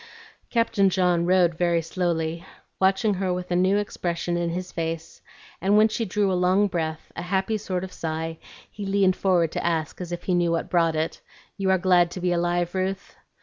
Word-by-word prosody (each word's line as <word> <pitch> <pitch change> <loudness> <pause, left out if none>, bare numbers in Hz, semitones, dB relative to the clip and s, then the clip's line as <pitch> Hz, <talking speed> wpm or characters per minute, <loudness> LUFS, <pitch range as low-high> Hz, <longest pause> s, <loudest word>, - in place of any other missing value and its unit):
Captain 230 -4 +2
John 180 -2 +2
rowed 180 -2 +4
very 170 -2 +2
slowly, 165 -1 -2 0.4
watching 195 +3 +3
her 190 -1 -1
with 180 0 -4
a - - +2
new 185 +3 +3
expression 175 -4 -2
in 175 0 -1
his 180 +2 -4
face; 165 -1 -5 0.4
and 200 +3 +3
when 215 +1 +6
she 225 +1 -2
drew 205 0 0
a - - +1
long 185 +3 +3
breath, 160 -4 -3
a - - -4
happy 190 +4 0
sort 190 -4 -3
of 185 -1 -7
sigh, 160 0 -4 0.3
he 205 - -7
leaned 195 -1 +2
forward 175 -5 +2
to - - -3
ask, 165 0 -1
as 175 -1 -6
if 175 - -5
he 185 - 0
knew 175 -1 +2
what 165 0 -2
brought 165 -2 +2
it, 155 +1 -2 0.3
"You 195 -2 -1
are 190 - +4
glad 180 -1 +4
to 185 - -7
be 180 0 0
alive, 175 0 0
Ruth?" 190 +1 -3
180 Hz, 200 wpm, -25 LUFS, 170-190 Hz, 0.4 s, when